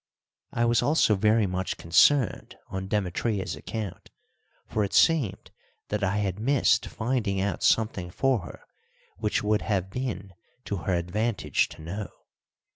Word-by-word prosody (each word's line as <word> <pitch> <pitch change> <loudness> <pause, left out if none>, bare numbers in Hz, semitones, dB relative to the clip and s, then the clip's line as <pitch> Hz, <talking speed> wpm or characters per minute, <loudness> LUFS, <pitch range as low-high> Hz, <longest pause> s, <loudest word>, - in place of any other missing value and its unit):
I 120 -1 +1
was 120 0 +3
also 145 -7 +3
very 105 +2 +3
much 95 0 -2
concerned 115 - +3
on 95 0 -4
Demetria's 100 +1 -1
account, 110 -5 -6 0.6
for 110 - -1
it 100 - -2
seemed 135 - +2 0.4
that 105 -1 -2
I 100 +2 +1
had 100 -2 -1
missed 135 +4 +2
finding 110 -4 -1
out 100 +1 -1
something 105 -5 +1
for 130 +6 +1
her 90 - -11 0.5
which 105 0 -1
would 105 0 +2
have 95 -3 -1
been 110 -5 -4 0.3
to 100 - -2
her 90 +2 -1
advantage 100 +6 0
to 80 - -12
know. 100 +5 -5
105 Hz, 140 wpm, -27 LUFS, 95-115 Hz, 0.6 s, was